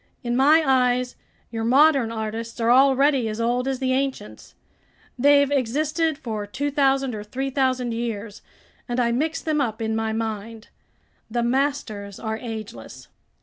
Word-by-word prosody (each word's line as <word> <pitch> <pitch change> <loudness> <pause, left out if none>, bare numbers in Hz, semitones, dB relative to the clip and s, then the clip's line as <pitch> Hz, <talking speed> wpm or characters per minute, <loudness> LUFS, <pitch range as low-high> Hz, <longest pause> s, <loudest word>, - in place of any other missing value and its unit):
In 240 -1 -1
my 300 +5 +5
eyes, 250 -1 +2 0.4
your 225 -1 -3
modern 270 0 +4
artists 225 +1 -5
are 230 +1 +2
already 270 -1 +4
as 215 +1 -5
old 245 +2 0
as 270 -1 -1
the 260 0 0
ancients. 260 - -4 0.6
They've 285 +1 +4
existed 300 +4 0
for 220 -7 -5
2,000 270 +1 0
or 210 -1 -5
3,000 260 +1 -1
years, 225 -3 -5 0.5
and 240 +1 -1
I 235 -1 +2
mix 305 +7 -1
them 305 -2 0
up 225 -4 -2
in 220 -1 -2
my 225 0 -1
mind. 220 0 -5 0.6
The 240 +1 -1
masters 240 -6 -2
are 220 -1 -4
ageless." 225 -2 -8
245 Hz, 145 wpm, -23 LUFS, 225-275 Hz, 0.6 s, my